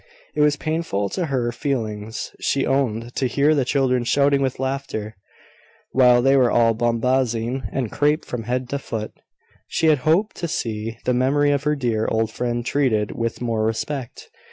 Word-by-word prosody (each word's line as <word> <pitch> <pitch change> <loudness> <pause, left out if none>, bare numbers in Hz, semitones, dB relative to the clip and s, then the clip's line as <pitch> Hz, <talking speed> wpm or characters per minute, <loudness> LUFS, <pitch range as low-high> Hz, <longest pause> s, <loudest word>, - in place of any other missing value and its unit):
It - - 0
was 150 -1 +4
painful 155 -11 -2
to 175 - -2
her 125 -4 0
feelings, 110 -4 -4
she 135 - 0
owned, 120 -3 -1
to 130 - 0
hear 145 +5 +3
the 140 -3 +2
children 130 -2 +1
shouting 140 +3 +3
with 130 -2 -1
laughter, 130 -5 -3 0.8
while 125 -2 +5
they 135 +1 +5
were 130 -3 +4
all 115 -1 +4
bombazine 120 +1 0
and 125 -5 -2
crape 150 +2 +1
from 115 -3 -5
head 125 +1 -2
to 140 - -2
foot: 110 -5 -5 0.6
she - - -1
had 150 -3 +4
hoped 170 +10 +1
to 170 - -3
see 115 -6 -3
the 125 - +2
memory 140 +4 +2
of 140 0 -1
her 150 0 +2
dear 115 -5 -1
old 110 0 0
friend 120 0 -2
treated 115 -8 +1
with 115 +1 -3
more 115 -2 0
respect. 120 +4 -4
125 Hz, 175 wpm, -22 LUFS, 115-140 Hz, 0.8 s, while